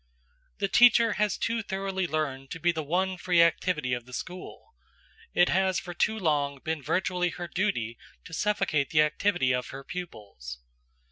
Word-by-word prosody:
The 200 Hz, -, 0 dB
teacher 235 Hz, 0 st, +6 dB
has 210 Hz, -1 st, +1 dB
too 230 Hz, 0 st, -1 dB
thoroughly 195 Hz, -2 st, -2 dB
learned 140 Hz, -4 st, -2 dB
to 165 Hz, -, -6 dB
be 175 Hz, +1 st, +3 dB
the 160 Hz, -2 st, -3 dB
one 185 Hz, +5 st, 0 dB
free 175 Hz, 0 st, +1 dB
activity 165 Hz, -5 st, +1 dB
of 120 Hz, 0 st, -4 dB
the 125 Hz, -, -13 dB
school; 185 Hz, -, -8 dB, 0.6 s
it 175 Hz, -, +5 dB
has 190 Hz, +1 st, +2 dB
for 180 Hz, -2 st, -7 dB
too 220 Hz, +5 st, +1 dB
long 145 Hz, -6 st, 0 dB
been 160 Hz, +2 st, -3 dB
virtually 180 Hz, +4 st, 0 dB
her 175 Hz, 0 st, -6 dB
duty 170 Hz, -, -1 dB, 0.3 s
to 165 Hz, -, -11 dB
suffocate 160 Hz, -7 st, 0 dB
the 155 Hz, -2 st, +5 dB
activity 150 Hz, -2 st, +1 dB
of 125 Hz, 0 st, -2 dB
her 135 Hz, +1 st, -8 dB
pupils. 105 Hz, -, -8 dB
175 Hz, 165 wpm, -28 LUFS, 140-190 Hz, 0.6 s, teacher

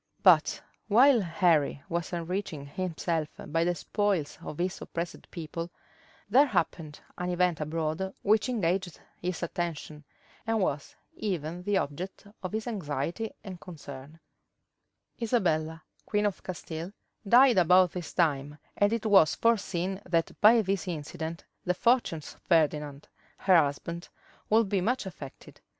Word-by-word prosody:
But -, -, +5 dB, 0.3 s
while 245 Hz, +3 st, +6 dB
Henry 165 Hz, -6 st, +2 dB
was 170 Hz, 0 st, -3 dB
enriching 170 Hz, -3 st, -3 dB
himself 165 Hz, -1 st, -2 dB
by 165 Hz, +2 st, -1 dB
the 175 Hz, +1 st, +1 dB
spoils 195 Hz, -4 st, -1 dB
of 150 Hz, -, -7 dB
his 185 Hz, +2 st, -2 dB
oppressed 170 Hz, +1 st, -6 dB
people, 165 Hz, 0 st, -5 dB, 0.6 s
there 265 Hz, +8 st, +5 dB
happened 165 Hz, -, -2 dB, 0.2 s
an 180 Hz, 0 st, -2 dB
event 180 Hz, -2 st, +1 dB
abroad 160 Hz, +4 st, -2 dB
which 215 Hz, +3 st, +3 dB
engaged 185 Hz, -6 st, -1 dB, 0.2 s
his 180 Hz, 0 st, -3 dB
attention, 165 Hz, -3 st, -4 dB, 0.4 s
and 225 Hz, 0 st, +1 dB
was 145 Hz, -7 st, -2 dB, 0.2 s
even 175 Hz, -4 st, -3 dB
the 200 Hz, +2 st, +1 dB
object 180 Hz, +6 st, -4 dB, 0.2 s
of 185 Hz, -, -4 dB
his 220 Hz, +1 st, -3 dB
anxiety 180 Hz, -, -3 dB
and 185 Hz, -4 st, -8 dB
concern: 145 Hz, -2 st, -10 dB, 1.0 s
Isabella, 160 Hz, -9 st, 0 dB, 0.2 s
queen 210 Hz, 0 st, +1 dB
of 205 Hz, -3 st, -1 dB
Castile, 175 Hz, -1 st, -6 dB, 0.4 s
died 245 Hz, -2 st, +7 dB
about 180 Hz, +1 st, +5 dB
this 175 Hz, -3 st, -6 dB
time 145 Hz, -4 st, 0 dB, 0.2 s
and 205 Hz, +1 st, +3 dB
it 230 Hz, -1 st, -1 dB
was 195 Hz, -7 st, +5 dB
foreseen 195 Hz, -4 st, 0 dB
that 165 Hz, -2 st, +1 dB
by 220 Hz, +1 st, +7 dB
this 195 Hz, -1 st, -1 dB
incident 160 Hz, 0 st, -5 dB, 0.2 s
the 180 Hz, -, 0 dB
fortunes 230 Hz, -, +1 dB
of -, -, -26 dB
Ferdinand, 150 Hz, -3 st, +1 dB, 0.3 s
her 190 Hz, -1 st, +4 dB
husband, 165 Hz, +3 st, 0 dB, 0.4 s
would 220 Hz, 0 st, +4 dB
be 195 Hz, -1 st, +1 dB
much 240 Hz, +4 st, 0 dB
affected. 155 Hz, -7 st, -10 dB
175 Hz, 135 wpm, -29 LUFS, 160-200 Hz, 1.0 s, died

